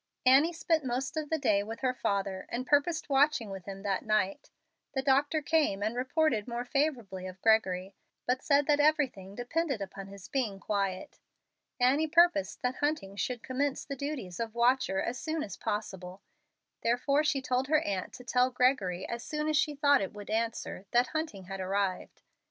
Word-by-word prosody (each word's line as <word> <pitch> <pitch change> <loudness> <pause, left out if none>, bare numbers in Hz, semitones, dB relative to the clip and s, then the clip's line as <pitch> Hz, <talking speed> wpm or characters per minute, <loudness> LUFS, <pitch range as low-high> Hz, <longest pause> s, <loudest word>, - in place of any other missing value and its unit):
Annie 275 +6 +6
spent 325 -2 0
most 260 +3 -2
of 310 -2 -3
the 320 - +1
day 205 -8 +2
with 225 +3 -7
her 255 -1 +1
father, 195 -5 -2
and 250 +2 -3
purposed 290 +4 +2
watching 275 -6 +2
with 190 -2 -7
him 195 0 -7
that 195 -2 -1
night. 215 -3 0 0.5
The 265 - 0
doctor 285 +3 +2
came 290 -11 +1
and 220 +3 -1
reported 255 -3 +1
more 240 0 -3
favorably 245 -10 -1
of 185 0 -9
Gregory, 195 -4 +2 0.3
but 255 +1 0
said 285 -1 +3
that 295 0 +3
everything 275 -11 +1
depended 275 +2 -1
upon 195 0 -7
his 195 -1 -11
being 225 -8 -2
quiet. 195 -2 -2 0.6
Annie 270 +6 +3
purposed 340 -2 +3
that 250 +1 -1
Hunting 290 -10 -1
should 230 +4 -3
commence 270 +2 -1
the 275 - -5
duties 270 - -5
of 230 -1 -3
watcher 240 -5 +2
as 240 +1 -3
soon 315 -1 -2
as 195 - -6
possible. 195 -3 -5 0.6
Therefore 275 +5 +2
she 295 -2 +1
told 260 0 -1
her 310 +1 +3
aunt 190 -2 -3
to 250 - -10
tell 250 0 +2
Gregory, 250 -8 +1
as 235 0 -5
soon 300 0 -3
as 310 - +1
she 295 0 +2
thought 285 -2 +4
it 195 - -3
would 205 0 -8
answer, 225 -3 -2
that 240 +1 +3
Hunting 310 -12 -3
had 195 +1 -7
arrived. 190 0 -2
245 Hz, 180 wpm, -30 LUFS, 200-285 Hz, 0.6 s, Annie